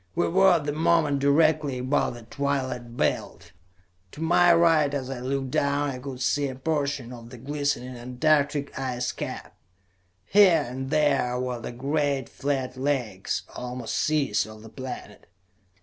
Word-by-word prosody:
We - - +2
were, 190 +2 +5
at 165 -4 +1
the 145 - -1
moment, 155 -2 +2
directly 145 -1 +3
above 130 0 0
the 120 - -11
twilight 130 -2 -3
belt. - - -2 0.6
To - - -11
my 175 +2 +4
right, 165 -4 +4
as 135 -1 -3
I 130 - -5
looked 135 +1 -2
down, 140 +1 +1
I 125 - -6
could 130 -1 -6
see 145 +2 +1
a 130 - -6
portion 140 -3 -2
of 115 -1 -11
the 125 - -10
glistening 140 -1 -2
antarctic 140 +3 0
ice 125 -2 -2
cap. - - -7 0.7
Here 185 -7 +5
and 130 +2 -5
there 135 -5 +2
were 125 -1 -3
the - - -5
great 140 +1 -1
flat 135 -2 -2
lakes, 130 -8 -2
almost 125 -2 -5
seas, 135 -10 +1
of 110 0 -12
the 110 - -11
planet. 130 +1 -8
140 Hz, 155 wpm, -26 LUFS, 125-150 Hz, 0.7 s, were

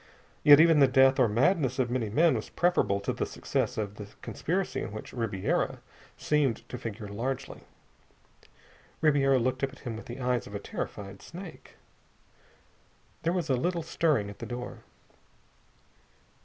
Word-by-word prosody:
Yet 145 -1 +9
even 165 -1 +6
the 135 - +7
death 130 +1 +5
or 125 - +5
madness 130 - +2
of 125 -2 0
many 120 -4 -1
men 160 +10 +4
was - - -3
preferable 175 - +1
to - - -2
the - - -2
success - - -2
of 105 -1 -3
the 105 - -7 0.2
conspiracy 185 +4 -2
in - - -5
which 110 - -8
Ribiera 110 -6 -1 0.4
seemed 145 -6 0
to 125 - -6
figure 110 -3 -6
largely. 130 +6 -4 1.4
Ribiera 140 -3 +4
looked 130 +2 -1
up 135 -1 -1
at - - -15
him 115 -2 -3
with 110 - -9
the 120 +2 -7
eyes 125 -2 0
of 100 - -9
a - - -2
terrified 100 -1 -6
snake. 180 0 -11 1.5
There 165 - +1
was 175 -3 -1
a 135 - +2
little 170 +6 -1
stirring 150 -11 +1
at 100 - -14
the - - -6
door. 125 0 -6
130 Hz, 160 wpm, -29 LUFS, 110-150 Hz, 1.5 s, Yet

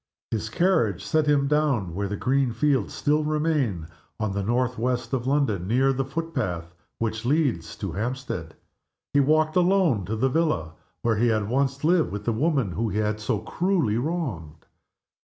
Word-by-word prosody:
His 110 -1 -2
carriage 115 - +1
set 155 -1 +1
him 140 -2 +3
down, 140 - +1
where 100 +3 -2
the 105 +1 -4
green 130 0 +1
fields 130 -2 +1
still 150 +1 +1
remain, 150 - 0 0.3
on 110 -2 -1
the 100 +1 -2
northwest 125 +3 -1
of 125 -1 -1
London, 125 -11 +1
near 130 +5 +3
the 135 +1 -1
foot 165 +5 -5
path 90 - -3 0.2
which 110 0 -2
leads 145 +1 0
to 100 -5 -4
Hampstead. 105 -5 -4 0.6
He 145 - +4
walked 155 +2 +3
alone 180 - +3
to 110 +5 -2
the 125 +5 +2
villa 130 - 0 0.3
where 115 -2 +2
he 120 +3 +3
had 110 -3 +1
once 135 +3 0
lived 170 +1 +3
with 105 +1 -5
the 115 - +1
woman 135 - +1
whom 110 +6 -1
he 105 - -3
had 105 0 0
so 105 - -1
cruelly 170 - 0
wronged. 120 - -4
125 Hz, 175 wpm, -25 LUFS, 105-150 Hz, 0.6 s, He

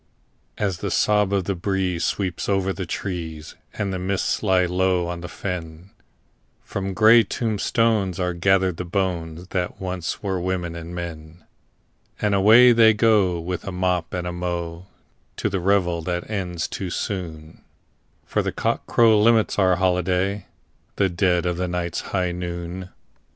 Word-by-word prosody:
As 95 -4 -1
the - - -3
sob 105 -2 +2
of 100 -2 +1
the 100 - -1
breeze 90 -1 -1
sweeps 95 -2 -2
over 95 -1 +1
the 95 -2 -5
trees, 80 -5 -5 0.2
and 100 -2 -2
the 95 - -3
mists 95 +1 -1
lie 95 -3 +3
low 90 0 +1
on 85 0 -5
the 85 - -7
fen, 85 0 -6 0.7
From 95 -1 -4
grey 110 +3 +7
tombstones 110 -4 0
are 90 -1 0
gathered 95 0 +2
the 90 - -3
bones 90 -2 -3
that 90 -2 -3
once 90 -1 -4
were 95 -3 -1
women 90 -2 -2
and 85 +1 -7
men, 85 -1 -7 0.8
And 105 -1 +1
away 110 +6 +7
they 115 -2 +6
go, 105 -6 +3
with 90 +1 -4
a 95 - -4
mop 90 -2 -1
and 90 -1 -3
a 90 - -3
mow, 85 0 -4 0.5
to - - -1
the 95 -1 -1
revel 90 -2 +1
that 90 +1 -3
ends 90 -6 -3
too 95 - -5
soon, 80 -5 -5 0.6
For - - 0
cockcrow 110 -3 +2
limits 110 -1 +3
our 95 -2 +4
holiday—the 95 +2 -1
dead 90 0 +1
of 90 -1 -1
the 90 0 -1
night's 85 -1 -2
high 90 -2 0
noon! 85 +1 -5
90 Hz, 150 wpm, -23 LUFS, 85-100 Hz, 0.8 s, grey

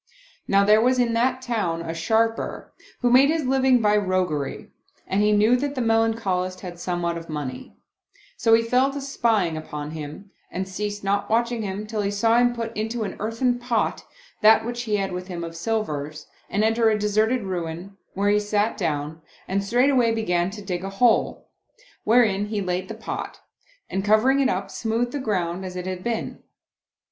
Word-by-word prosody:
Now 200 0 +4
there 215 +1 +5
was 255 +2 +3
in 240 -2 +2
that 250 +2 +1
town 190 -9 -1
a 165 - -4
Sharper, 225 +7 -1 0.3
who 245 -1 +2
made 265 +3 +6
his 320 -2 0
living 260 -1 +3
by 210 -1 +3
roguery, 185 -8 -1 0.3
and 195 +2 0
he 210 0 +3
knew 210 +3 +4
that 285 +2 -3
the 255 - -1
Melancholist 225 -5 0
had 175 -2 -8
somewhat 175 -1 -2
of 165 - -13
money; 145 -5 -6 0.6
so 225 0 +4
he 230 - +2
fell 250 +4 +2
to 285 - -4
spying 225 - 0
upon 150 -1 -6
him 155 +6 -8 0.2
and 190 +1 -4
ceased 205 +2 -4
not 200 +1 0
watching 235 +1 +1
him 205 0 -4
till 215 0 -3
he 200 - 0
saw 225 +3 +3
him 245 0 +4
put 230 -1 -5
into 225 +2 -2
an 200 - -5
earthen 235 +3 0
pot 245 -2 -1 0.4
that 220 +1 +6
which 240 0 -3
he 215 -2 0
had 195 -2 -1
with 180 0 -5
him 175 -3 -5
of 165 0 -7
silvers 155 -7 -3 0.2
and 205 +2 0
enter 225 +1 +3
a 215 - +2
deserted 215 +3 +1
ruin, 180 0 -5 0.2
where 200 +1 +1
he 210 - +3
sat 210 +1 0
down, 155 -3 -2 0.3
and 195 +1 0
straightway 245 +2 +3
began 180 -6 0
to 205 +1 -9
dig 180 -2 -3
a 195 - -3
hole, 225 +4 +2 0.6
wherein 210 -3 +3
he 210 -1 -2
laid 185 -1 -2
the - - -6
pot - - -6 0.5
and 195 - -2
covering 215 +7 +4
it 270 -1 +3
up, 195 -3 -2
smoothed 230 +2 -1
the 290 - -3
ground 185 -6 -2
as 185 -1 -6
it 180 0 -5
had 185 -1 -5
been. 235 -2 -3
210 Hz, 190 wpm, -24 LUFS, 185-230 Hz, 0.6 s, made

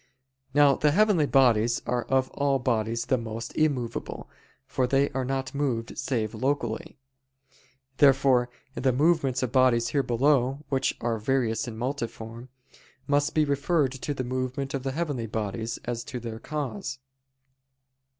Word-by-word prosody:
Now 145 -2 +6
the 150 - +3
heavenly 185 -2 +3
bodies 120 -4 +4
are 120 -1 -1
of 130 -1 +1
all 140 -1 +1
bodies 115 -2 -1
the 130 - +1
most 115 0 -6
immovable, 135 -7 -1 0.4
for 130 - 0
they 135 +2 +2
are 135 -2 -2
not 135 +1 -3
moved 125 -5 -2
save 110 -5 -2
locally. 120 -1 -2 1.0
Therefore 135 -3 +4 0.2
the 130 -2 +1
movements 140 -2 +2
of 125 - -2
bodies 125 -3 +3
here 140 - +2
below, 135 +2 +1
which 135 -1 0
are 115 -1 -1
various 120 0 0
and 110 -2 -6
multiform, 115 -1 -5 0.6
must 145 +1 +1
be 155 -1 +4
referred 140 0 +1
to 135 +2 -4
the 130 - -2
movement 130 +2 -3
of 135 - -2
the 135 0 -3
heavenly 145 -7 -2
bodies, 110 +2 -3
as 120 -1 -3
to 125 - -5
their 115 -1 -6
cause. 135 -4 -4
130 Hz, 145 wpm, -27 LUFS, 120-140 Hz, 1.0 s, Now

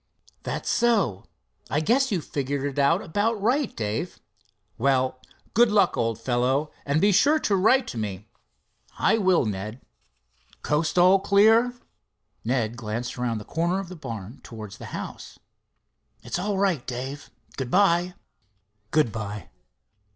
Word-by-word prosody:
"That's - - -4
so. 205 - +1 0.4
I 150 - +1
guess 250 - +2
you've 180 -6 -1
figured 140 -1 -3
it 145 0 -3
out 165 +7 +3
about 210 +6 0
right, 250 +6 0
Dave. 110 +11 -3 0.6
Well, 130 0 +1 0.3
good 235 +1 +5
luck, 200 -4 +3
old 115 -1 -1
fellow, 130 +5 0 0.2
and 140 +2 +2
be 205 +4 +4
sure 280 - +4
to 200 - +1
write 235 +7 +4
to 115 - -5
me." 105 -1 -5 0.7
"I 225 +3 +3
will, 185 - +3
Ned. 105 +3 -4 0.8
Coast 150 +3 0
all 185 +2 +6
clear?" 220 +5 +4 0.7
Ned 120 -1 -1
glanced 115 +1 -4
around 125 -2 -2
the 105 - -8
corner 170 +3 0
of 195 -3 -6
the 185 - -8
barn 115 - -7
towards 110 -4 -10
the - - -8
house. - - -8 0.9
"It's - - -3
all 200 +2 -1
right, 190 -9 +1
Dave—good 130 0 -7
by." 180 0 +3 0.7
"Good 155 -7 +2
by." 105 -1 -6
150 Hz, 140 wpm, -25 LUFS, 120-195 Hz, 0.9 s, all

